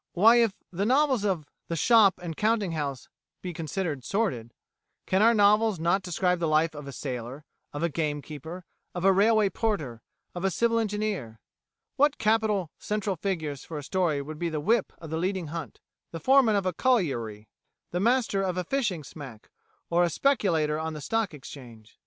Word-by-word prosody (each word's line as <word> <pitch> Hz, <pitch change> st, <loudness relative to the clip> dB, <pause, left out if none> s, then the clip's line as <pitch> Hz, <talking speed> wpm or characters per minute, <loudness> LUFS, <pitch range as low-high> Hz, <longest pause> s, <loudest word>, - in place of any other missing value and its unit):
Why, 225 Hz, +6 st, +6 dB
if 230 Hz, -4 st, +3 dB, 0.2 s
novels 255 Hz, -, +2 dB
of 185 Hz, -7 st, -1 dB, 0.2 s
the 165 Hz, -, -2 dB
shop 215 Hz, +1 st, +5 dB
and 170 Hz, -2 st, -6 dB
counting 215 Hz, -2 st, +1 dB
house 145 Hz, -5 st, -4 dB, 0.4 s
be 180 Hz, -1 st, -4 dB
considered 160 Hz, -3 st, -3 dB
sordid, 160 Hz, -, -1 dB, 0.5 s
can 190 Hz, +1 st, +2 dB
our 230 Hz, +2 st, +5 dB
novels 210 Hz, -1 st, +4 dB
not 170 Hz, +4 st, +2 dB
describe 180 Hz, 0 st, 0 dB
the 170 Hz, -, 0 dB
life 155 Hz, +1 st, +2 dB
of 145 Hz, -2 st, -9 dB
a -, -, -6 dB
sailor, 130 Hz, +1 st, -6 dB, 0.3 s
of 145 Hz, +3 st, -4 dB
a 170 Hz, -, +2 dB
game 150 Hz, -2 st, -2 dB
keeper, 160 Hz, +4 st, -8 dB, 0.3 s
of 175 Hz, +1 st, -2 dB
a 195 Hz, -, +6 dB
railway 210 Hz, +1 st, +3 dB
porter, 155 Hz, -, -2 dB, 0.3 s
of 175 Hz, -, -6 dB
a 195 Hz, -, +3 dB
civil 230 Hz, +5 st, +1 dB
engineer? 210 Hz, -, -3 dB, 0.6 s
What 290 Hz, +1 st, +3 dB
capital 215 Hz, -6 st, +1 dB
central 210 Hz, -2 st, -2 dB
figures 160 Hz, -7 st, -3 dB
for 160 Hz, -, -7 dB
a 145 Hz, -, -6 dB
story 155 Hz, -3 st, 0 dB
would 155 Hz, +2 st, -8 dB
be 170 Hz, -, -1 dB
the 155 Hz, -2 st, -3 dB
whip 220 Hz, +7 st, +1 dB
of 160 Hz, -1 st, -9 dB
a -, -, 0 dB
leading 180 Hz, -1 st, -2 dB
hunt, 165 Hz, -2 st, -6 dB, 0.3 s
the 165 Hz, -, -7 dB
foreman 260 Hz, -, +4 dB
of 200 Hz, -2 st, 0 dB
a 185 Hz, -, 0 dB
colliery, 125 Hz, -, 0 dB, 0.4 s
the 175 Hz, -, -1 dB
master 230 Hz, -2 st, +2 dB
of 185 Hz, -2 st, -1 dB
a 180 Hz, -, 0 dB
fishing 195 Hz, -, -1 dB
smack, 135 Hz, -7 st, -11 dB, 0.4 s
or 175 Hz, +1 st, +4 dB
a 175 Hz, -, +2 dB
speculator 165 Hz, -, +1 dB
on 160 Hz, 0 st, -3 dB
the 150 Hz, -, -7 dB
Stock 225 Hz, +6 st, -1 dB
Exchange?" 120 Hz, -6 st, -12 dB
180 Hz, 180 wpm, -27 LUFS, 150-210 Hz, 0.6 s, Why